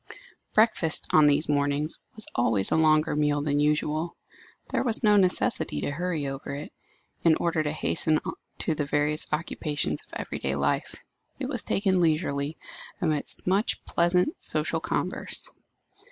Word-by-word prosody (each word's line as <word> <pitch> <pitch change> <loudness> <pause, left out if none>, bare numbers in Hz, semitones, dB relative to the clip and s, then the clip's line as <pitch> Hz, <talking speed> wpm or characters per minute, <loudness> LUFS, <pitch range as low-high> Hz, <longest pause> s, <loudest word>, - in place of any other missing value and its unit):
Breakfast, 215 -7 +2
on 155 -1 +6
these 145 +2 +2
mornings, 145 +1 0 0.2
was 220 - -3
always 115 -5 +1
a - - +3
longer 155 -1 +3
meal 150 -1 +1
than 145 -1 +1
usual. 150 +2 0 0.5
There - - +1
was 235 -1 +2
no 210 -1 +5
necessity 185 - +2
to - - -2
hurry 165 -1 -2
over 135 0 -5
it, 145 +2 -8 0.5
in 165 -2 +5
order 165 -1 0
to 150 -1 -1
hasten 155 0 +1 0.4
to 160 - 0
the 150 -1 -2
various 150 +1 0
occupations 150 - -2
of - - -21
every - - -5
day 70 0 -1
life. 70 +1 -1 0.4
It - - -4
was - - -1
taken 190 -2 +1
leisurely, 155 -2 0 0.4
amidst 155 -6 +1
much 195 +4 0
pleasant, 180 - +2
social - - +1
converse. - - -2
155 Hz, 150 wpm, -27 LUFS, 145-170 Hz, 0.5 s, on